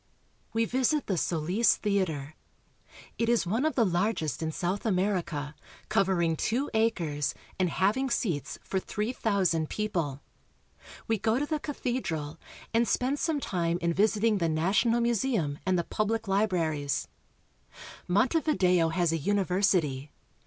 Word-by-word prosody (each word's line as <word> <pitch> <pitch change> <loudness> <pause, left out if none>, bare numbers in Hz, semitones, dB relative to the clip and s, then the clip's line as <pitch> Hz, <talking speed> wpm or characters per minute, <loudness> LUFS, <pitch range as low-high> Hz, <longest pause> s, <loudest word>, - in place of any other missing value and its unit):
We 225 0 +1
visit 260 +5 +1
the 195 - -1
Solis 175 +7 +2
Theater. 170 -9 -1 0.9
It 230 0 +1
is 235 -4 +2
one 225 - 0
of 315 - 0
the 235 - +4
largest 175 - 0
in 160 0 -1
South 180 +5 -2
America, 180 -8 -1 0.4
covering 175 -4 +2
two 245 - -1
acres 170 -11 0 0.2
and 185 -1 +2
having 215 +10 +1
seats 165 - -1
for 190 - -1
three 210 +5 -3
thousand 185 -9 +1
people. 170 -10 -2 0.9
We 225 -2 +1
go 220 +3 +1
to 290 - 0
the 310 0 -2
cathedral, 170 - -3 0.3
and 230 +1 +3
spend 270 +3 0
some 320 -3 0
time 170 -8 -1
in 170 0 0
visiting 215 +2 +2
the 165 -2 +1
national 200 +9 +2
museum 230 - 0
and 185 -1 +3
the 170 - +1
pub 215 +5 -1
206 225 +1 -1
URUGUAY. - - -2
lie 200 - +4
libraries. 160 -9 -1 1.0
Montevideo 190 - +2
has 170 0 +1
a 165 - 0
university. 180 -6 +1
190 Hz, 145 wpm, -28 LUFS, 165-225 Hz, 1.0 s, the